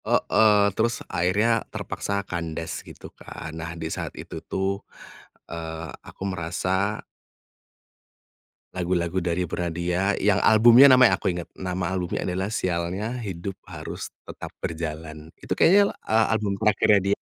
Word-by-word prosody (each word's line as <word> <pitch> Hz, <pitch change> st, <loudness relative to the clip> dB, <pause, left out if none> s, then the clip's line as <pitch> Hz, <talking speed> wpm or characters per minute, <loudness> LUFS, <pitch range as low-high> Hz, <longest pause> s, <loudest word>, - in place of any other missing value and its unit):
Heeh. 105 Hz, -2 st, +4 dB
Terus 115 Hz, +3 st, -1 dB
akhirnya 105 Hz, +6 st, +1 dB
terpaksa 100 Hz, 0 st, -3 dB
kandas 85 Hz, -2 st, -4 dB
gitu -, -, -12 dB
kan. 80 Hz, -, -9 dB
Nah, 85 Hz, +1 st, -6 dB
di 80 Hz, -, -5 dB
saat -, -, -5 dB
itu -, -, -7 dB
tuh, 95 Hz, +1 st, -2 dB, 0.7 s
eee, 80 Hz, -1 st, -6 dB
aku -, -, -11 dB
merasa 95 Hz, +3 st, -1 dB, 1.7 s
lagu-lagu 90 Hz, 0 st, -1 dB
dari 85 Hz, +1 st, -1 dB
Bernadya 90 Hz, +3 st, -1 dB
yang 100 Hz, 0 st, +2 dB
albumnya 120 Hz, +6 st, +8 dB
namanya 130 Hz, -2 st, +6 dB
aku -, -, -3 dB
inget. 85 Hz, -1 st, -6 dB
Nama 90 Hz, -1 st, -2 dB
albumnya 90 Hz, -1 st, -2 dB
adalah 95 Hz, +1 st, -2 dB
Sialnya 95 Hz, +4 st, -2 dB
Hidup 95 Hz, -3 st, -6 dB
Harus -, -, -7 dB, 0.2 s
Tetap -, -, -8 dB, 0.2 s
Berjalan. 80 Hz, -1 st, -5 dB
Itu -, -, -5 dB
kayaknya, 200 Hz, +3 st, +6 dB, 0.2 s
eee 110 Hz, 0 st, +4 dB
album 105 Hz, -3 st, 0 dB
terakhirnya 105 Hz, -1 st, +3 dB
dia. -, -, +3 dB
95 Hz, 130 wpm, -25 LUFS, 85-105 Hz, 1.7 s, albumnya